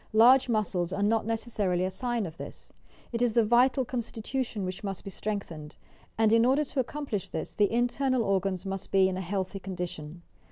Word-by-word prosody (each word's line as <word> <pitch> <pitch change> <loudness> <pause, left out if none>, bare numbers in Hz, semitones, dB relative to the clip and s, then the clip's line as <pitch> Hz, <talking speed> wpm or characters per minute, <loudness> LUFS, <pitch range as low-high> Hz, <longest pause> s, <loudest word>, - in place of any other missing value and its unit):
Large 250 +4 +6
muscles 195 -6 0
are 200 +1 -1
not 220 +1 +2
necessarily 210 -6 0
a 190 - -2
sign 240 -1 -1
of 165 -2 -8
this. - - -9 0.4
It 235 0 -2
is 240 -2 +2
the 235 - +5
vital 250 +3 +4
constitution 235 -2 -3
which 185 +2 -5
must 195 -2 -4
be 195 - -7
strengthened, 170 -8 -5 0.4
and, 220 0 +4
in 230 0 +5
order 265 +5 +3
to 280 -1 -4
accomplish 255 - -3
this, 160 - -5
the 205 -2 +2
internal 245 +1 +1
organs 195 -2 0
must 195 -1 -4
be 190 -1 +4
in 190 - -2
a 185 - -3
healthy 190 +1 -3
condition. 175 -3 -6
210 Hz, 190 wpm, -28 LUFS, 190-240 Hz, 0.4 s, Large